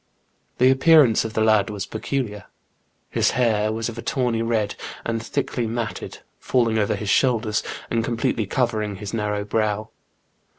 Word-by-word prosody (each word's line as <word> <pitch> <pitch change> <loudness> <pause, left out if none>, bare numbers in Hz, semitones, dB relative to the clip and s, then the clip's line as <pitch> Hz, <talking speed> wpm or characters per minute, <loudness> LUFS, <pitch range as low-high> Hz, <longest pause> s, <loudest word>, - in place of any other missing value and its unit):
The 130 +1 +5
appearance 135 -4 +5
of 110 - -5
the 110 - +1
lad 110 -1 +3
was 100 -2 -4
peculiar. 110 -4 -4 0.7
His - - +2
hair 110 -4 +2
was 110 0 -2
of 115 -1 -6
a - - -4
tawny 125 -4 0
red 110 -3 0 0.3
and 115 -1 -1
thickly 115 +1 -2
matted, 115 -1 -4 0.2
falling 115 -3 +1
over 105 - +1
his 105 - -4
shoulders 115 -4 +2 0.3
and 115 -1 +1
completely 115 -2 -1
covering 110 -4 -1
his 105 +2 -7
narrow 105 -2 -1
brow. 110 0 -1
110 Hz, 155 wpm, -23 LUFS, 105-120 Hz, 0.7 s, The